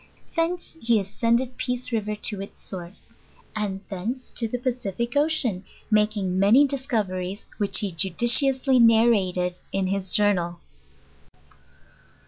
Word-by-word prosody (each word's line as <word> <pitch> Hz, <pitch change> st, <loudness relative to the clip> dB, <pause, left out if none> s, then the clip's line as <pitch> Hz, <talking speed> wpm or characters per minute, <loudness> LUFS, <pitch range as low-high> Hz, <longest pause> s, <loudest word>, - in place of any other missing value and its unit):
Thence 340 Hz, +1 st, -1 dB
he 230 Hz, -3 st, +2 dB
ascended 235 Hz, +5 st, -1 dB
Peace 250 Hz, 0 st, -2 dB
River 215 Hz, -2 st, -1 dB
to 205 Hz, -1 st, -4 dB
its 195 Hz, -, -9 dB
source, 180 Hz, 0 st, -7 dB, 0.4 s
and 200 Hz, -3 st, -3 dB
thence 220 Hz, +7 st, -5 dB
to 230 Hz, -, -2 dB
the 245 Hz, -, -3 dB
Pacific 240 Hz, -1 st, -3 dB
ocean; 285 Hz, -, +1 dB, 0.3 s
making 210 Hz, -3 st, +1 dB
many 225 Hz, +9 st, +6 dB
discoveries 210 Hz, -9 st, -3 dB
which 205 Hz, -2 st, +2 dB
he 205 Hz, -2 st, -1 dB
judiciously 245 Hz, -, +3 dB
narrated 205 Hz, -6 st, +3 dB
in 195 Hz, -1 st, 0 dB
hie 195 Hz, +1 st, 0 dB
jour 205 Hz, +2 st, +2 dB
nal. 175 Hz, -2 st, -4 dB
215 Hz, 120 wpm, -24 LUFS, 190-245 Hz, 0.4 s, many